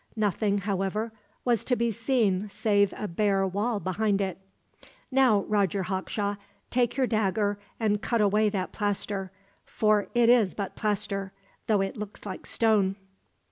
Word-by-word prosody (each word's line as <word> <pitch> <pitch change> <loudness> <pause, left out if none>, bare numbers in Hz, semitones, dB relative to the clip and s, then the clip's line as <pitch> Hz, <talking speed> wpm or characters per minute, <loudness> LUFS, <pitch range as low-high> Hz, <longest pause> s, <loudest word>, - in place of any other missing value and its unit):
Nothing, 205 -1 +1
however, 200 +3 -2 0.3
was 240 -4 +2
to 250 - +2
be 235 -1 +1
seen 215 -4 +1
save 200 -1 +2
a 210 - -3
bare 195 +1 +1
wall 205 +4 -1
behind 200 +2 0
it. 190 -2 -2 0.7
"Now, 255 -6 +4
Roger 200 -2 +1
Hawkshaw, 200 +2 -2 0.3
take 245 0 +1
your 265 - +3
dagger 205 -2 0 0.2
and 210 -2 +1
cut 235 0 0
away 210 +1 +3
that 190 -3 -3
plaster 200 -2 -2 0.3
for 215 -1 +1
it 240 -1 +5
is 235 -6 +4
but 200 -2 -4
plaster, 200 -2 -2 0.3
though 210 -3 +3
it 195 +5 -3
looks 210 0 -8
like 190 - -6
stone." 210 -4 +2
205 Hz, 145 wpm, -27 LUFS, 195-220 Hz, 0.7 s, it